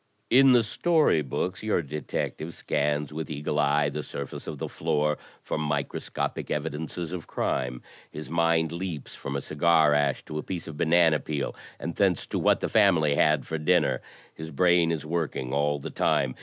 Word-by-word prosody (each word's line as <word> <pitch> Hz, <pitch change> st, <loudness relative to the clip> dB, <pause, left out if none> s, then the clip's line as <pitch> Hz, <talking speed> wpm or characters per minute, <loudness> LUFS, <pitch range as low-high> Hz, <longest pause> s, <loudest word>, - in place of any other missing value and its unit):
In 135 Hz, +1 st, +7 dB
the 120 Hz, -2 st, +5 dB
story 155 Hz, -, +2 dB
books 80 Hz, +7 st, -3 dB
your 110 Hz, -6 st, 0 dB
detective 75 Hz, +2 st, -4 dB
scans 75 Hz, 0 st, -1 dB
with 80 Hz, +1 st, -5 dB
eagle 75 Hz, 0 st, -2 dB
eye 75 Hz, 0 st, +3 dB
the 75 Hz, +1 st, -4 dB
surface 70 Hz, -1 st, -7 dB
of -, -, -5 dB
the -, -, -4 dB
floor 75 Hz, 0 st, 0 dB, 0.2 s
for -, -, -3 dB
microscopic 75 Hz, -2 st, -3 dB
evidences 80 Hz, +2 st, -3 dB
of 90 Hz, -3 st, -6 dB
crime. 65 Hz, -1 st, -2 dB, 0.3 s
His 75 Hz, 0 st, -8 dB
mind 85 Hz, 0 st, +2 dB
leaps 85 Hz, -4 st, -5 dB
from 70 Hz, -, -6 dB
a 70 Hz, -, -1 dB
cigar 80 Hz, 0 st, +3 dB
ash 75 Hz, -2 st, +1 dB
to 75 Hz, -, -5 dB
a -, -, -4 dB
piece 90 Hz, -3 st, -5 dB
of 80 Hz, -, -8 dB
banana 80 Hz, 0 st, +4 dB
peel 75 Hz, 0 st, -3 dB, 0.2 s
and 85 Hz, -, -4 dB
thence 95 Hz, -4 st, +2 dB
to -, -, +1 dB
what -, -, +3 dB
the -, -, 0 dB
family 75 Hz, -3 st, +4 dB
had 75 Hz, 0 st, +3 dB
for 80 Hz, -, -3 dB
dinner. 75 Hz, -, +2 dB, 0.3 s
His 80 Hz, 0 st, -8 dB
brain 85 Hz, +2 st, +3 dB
is 80 Hz, -2 st, -3 dB
work 80 Hz, -1 st, -2 dB
ing 65 Hz, 0 st, -4 dB
all 75 Hz, +1 st, +1 dB
the 70 Hz, -, -7 dB
time. 65 Hz, -2 st, +1 dB
75 Hz, 185 wpm, -27 LUFS, 75-85 Hz, 0.3 s, In